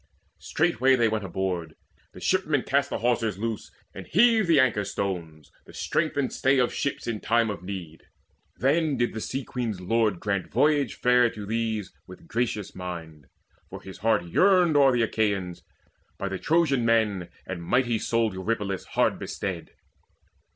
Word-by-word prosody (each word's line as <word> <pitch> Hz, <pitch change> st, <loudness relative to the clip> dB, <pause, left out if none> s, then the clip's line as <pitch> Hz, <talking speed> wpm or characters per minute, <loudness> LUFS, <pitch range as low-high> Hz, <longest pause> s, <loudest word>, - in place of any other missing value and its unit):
Straightway 130 Hz, +3 st, +2 dB
they 120 Hz, -2 st, +3 dB
went 110 Hz, -1 st, -1 dB
aboard: 90 Hz, -2 st, -3 dB, 0.4 s
the -, -, -12 dB
shipmen 155 Hz, -8 st, +1 dB
cast 140 Hz, +1 st, +1 dB
The -, -, -2 dB
hawsers 115 Hz, -4 st, 0 dB
loose, 110 Hz, 0 st, -4 dB, 0.2 s
and -, -, -9 dB
heaved 220 Hz, +1 st, +4 dB
the 165 Hz, -4 st, +5 dB
anchor 115 Hz, -6 st, +3 dB
stones, 85 Hz, -7 st, -5 dB, 0.2 s
The -, -, -14 dB
strength 155 Hz, -2 st, -1 dB
and 135 Hz, -3 st, 0 dB
stay 135 Hz, +1 st, +2 dB
of 125 Hz, -1 st, +2 dB
ships 140 Hz, -, -3 dB
in 115 Hz, -3 st, -3 dB
time 115 Hz, 0 st, +1 dB
of 100 Hz, -, -7 dB
need. 90 Hz, -4 st, -7 dB, 0.6 s
Then 150 Hz, +2 st, +1 dB
did 120 Hz, -, 0 dB
the 110 Hz, -, -5 dB
Sea 135 Hz, +4 st, -3 dB
queen's 115 Hz, -7 st, -4 dB
lord 110 Hz, 0 st, +1 dB
grant 100 Hz, -2 st, -2 dB
voyage 145 Hz, +3 st, +2 dB
fair 125 Hz, -1 st, +4 dB
To 105 Hz, -2 st, -8 dB
these 110 Hz, -2 st, -2 dB
with 90 Hz, -, -13 dB
gracious 115 Hz, -3 st, -2 dB
mind; 80 Hz, -6 st, -8 dB, 0.4 s
for -, -, -8 dB
his 95 Hz, -, -11 dB
heart 115 Hz, -3 st, +2 dB
yearned 180 Hz, -, +4 dB
O'er 140 Hz, -2 st, +6 dB
the 120 Hz, -2 st, +2 dB
Achaeans, 100 Hz, -6 st, -1 dB, 0.6 s
by 100 Hz, -, -3 dB
the 95 Hz, -1 st, -4 dB
Trojan 155 Hz, -6 st, +2 dB
men 105 Hz, -6 st, +1 dB, 0.2 s
And 90 Hz, -2 st, -5 dB
mighty 120 Hz, +5 st, +1 dB
souled 115 Hz, -2 st, 0 dB
Eurypylus 100 Hz, 0 st, -3 dB
hard -, -, +2 dB
bestead. -, -, -5 dB
115 Hz, 165 wpm, -26 LUFS, 95-130 Hz, 0.6 s, O'er